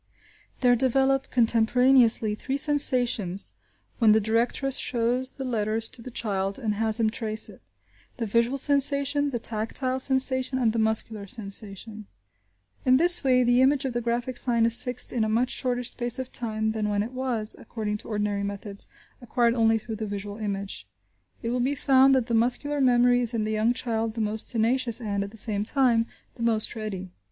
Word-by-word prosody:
There 245 -1 +4
develop, 270 +2 +1
contemporaneously, 235 -1 +3
three 265 +6 -4
sensations 250 - +2 0.5
when 220 -3 +5
the 220 - +4
directress 235 +5 0
shows 250 +2 0
the 270 - -7
letter 220 -3 -1
to 225 +2 -4
the 255 - -9
child 195 -4 -3
and 220 -5 -2
has 220 +1 -1
him 220 -1 +1
trace 220 -3 -1
it; 195 - -15 0.6
the 235 - -3
visual 235 +5 0
sensation, 280 +1 +2
the 250 - -3
tactile 235 +4 -2
sensation, 260 0 +3
and 235 -4 +1
the 230 - -1
muscular 220 -1 -1
sensation. 210 0 -5 0.8
In 255 0 +4
this 350 +3 +7
way 255 -2 +3
the 245 +1 +3
image 270 +1 +2
of 260 - -3
the 240 - -2
graphic 240 +2 -3
sign 235 -2 +2
is 230 0 +2
fixed 250 -1 -3
in 235 -3 0
a 220 - -1
much 240 +3 0
shorter 250 -1 -2
space 240 0 0
of 260 -1 -6
time 220 -2 -2
than 215 -1 -3
when 205 0 0
it 230 - -7
was, 250 -4 -2
according 210 -2 -5
to - - -9
ordinary 205 -2 -2
methods, 200 0 -4 0.3
acquired 240 -1 0
only 225 -1 +2
through 220 0 -7
the 220 0 -5
visual 205 0 -6
image. 200 - -5 0.6
It 230 - -2
will 250 +1 -1
be 265 +4 0
found 270 0 +4
that 255 -3 +1
the 235 - -4
muscular 250 +5 0
memory 245 -1 +3
is 235 -1 +2
in 220 - -1
the 215 - -3
young 215 +2 +1
child 225 -2 -2
the 225 - -3
most 215 0 -1
tenacious 235 0 0
and, 200 -4 -3
at 200 - -7
the 225 - -15
same 205 -1 +2
time, 235 -1 +2 0.3
the - - -10
most 230 -1 0
ready. 195 -4 -6
230 Hz, 185 wpm, -25 LUFS, 215-255 Hz, 0.8 s, this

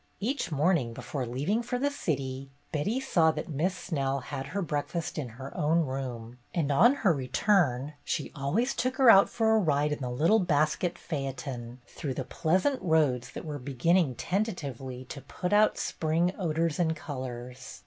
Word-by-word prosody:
Each 250 - -2
morning, 150 -5 +2
before 130 +2 -4
leaving 145 - 0
for 245 +1 -2
the 285 +3 0
city, 135 - -3 0.2
Betty 200 - 0
saw 175 -12 +3
that - - -5
Miss 165 +6 0
Snell 140 -5 -1
had 135 +2 -5
her 190 +6 -2
breakfast 155 +1 -3
in 130 -5 -4
her 135 +1 -8
own 160 +3 +2
room, 125 -4 -5 0.2
and 155 -5 +1
on 240 - +6
her 180 - +6
return 140 - +1
she 150 - -2
always 160 - 0
took 255 +1 -1
her 260 -4 +7
out 195 -1 +7
for 220 -1 +2
a - - +5
ride 150 -5 +1
in 150 - -2
the 125 -3 -3
little 165 - +3
basket 170 0 +1
phaeton, 130 -4 -5
through 135 +1 -5
the 130 - -2
pleasant 185 - +1
roads 150 -8 +2
that - - -7
were 150 -2 -4
beginning 140 +3 +1
tentatively 140 - -3
to 140 +2 -8
put 180 +8 -4
out 210 +1 +4
spring 165 +3 0
odors 165 -3 -1
and 160 -2 +2
colors. 125 -4 -7
150 Hz, 170 wpm, -29 LUFS, 130-185 Hz, 0.2 s, her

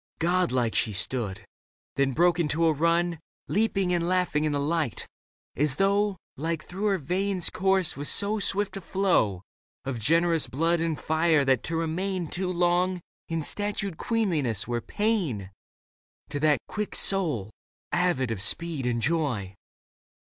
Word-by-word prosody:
God 175 +2 +1
like 120 -3 +1
she 115 -4 +1
stood; 100 0 -3 0.5
then 140 -1 +1
broke 175 +3 +3
into 165 0 +1
a 160 - +4
run. 170 +2 +1 0.3
Leaping 195 -3 +1
and 170 -1 0
laughing 180 -4 +1
in 155 - +1
the 145 - 0
light, 150 - -1 0.5
as 145 -1 +1
though 200 +2 +2 0.2
Life 165 +3 -2
through 190 +4 -5
her 200 -2 +2
veins 185 +3 0
coursed 190 -2 +1
with 145 +1 -2
so 210 +2 +3
swift 200 +1 0
a 195 - -5
flow 170 - +1 0.4
Of 130 -3 -3
generous 165 +6 +2
blood 165 +5 +1
and 165 -2 -1
fire 160 -2 +2
that 130 -3 +3
to 165 - -2
remain 170 +2 -2
Too 180 0 -2
long 180 +1 +1 0.3
in 165 -1 -2
statued 205 -1 -1
queenliness 160 - 0
were 120 -1 -1
pain 165 - -1 0.8
To 145 - -3
that 150 -1 +4
quick 210 -1 -4
soul, 150 - +1 0.4
avid 130 -10 +1
of 105 -4 -3
speed 140 - 0
and 115 -2 -1
joy. 135 - 0
165 Hz, 150 wpm, -27 LUFS, 140-185 Hz, 0.8 s, a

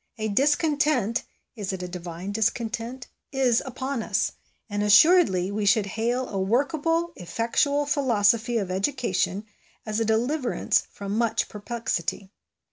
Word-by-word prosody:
A 220 -1 -2
discontent, 290 - +1 0.3
is 205 -4 -4
it 185 -1 -5
a - - -4
divine 175 +1 -6
discontent? 230 +3 -2 0.3
is 260 -4 +2
upon 260 0 -3
us; 215 -2 0 0.4
and 205 -1 -2
assuredly 210 - +5
we 210 +1 -2
should 205 0 +4
hail 240 +5 -1
a 195 - -3
workable, 315 - 0
effectual 235 - 0
philosophy 240 -4 +2
of 195 -4 -2
education 195 -2 -1 0.4
as 215 0 -2
a - - +2
deliverance 245 +5 +1
from 200 0 -5
much 225 -1 +1
perplexity. 205 -3 -3
225 Hz, 125 wpm, -25 LUFS, 200-265 Hz, 0.4 s, assuredly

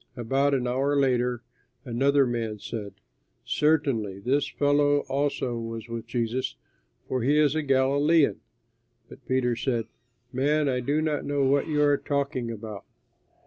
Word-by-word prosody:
About 135 +4 +1
an 125 -2 -1
hour 135 +4 0
later 125 -2 +1 0.4
another 135 +3 +3
man 115 -3 -2
said, 105 -1 -6 0.5
"Certainly 135 -11 +1
this 135 +6 +1
fellow 145 0 +2
also 135 -3 -2
was 115 0 -6
with 115 0 -6
Jesus, 120 +2 -2 0.5
for 130 - -1
he 140 +5 +2
is 150 -2 +4
a 155 - 0
Galilean." 140 +3 +3 0.7
But - - -14
Peter 125 -2 +1
said, 120 -2 -1 0.5
"Man, 145 +3 +1
I 130 -2 +1
do 145 +5 0
not 150 -2 -1
know 145 -1 0
what 140 +1 +2
you 150 -2 +1
are 145 -1 +4
talking 140 -5 -2
about." 110 -3 -7
130 Hz, 145 wpm, -26 LUFS, 120-145 Hz, 0.7 s, is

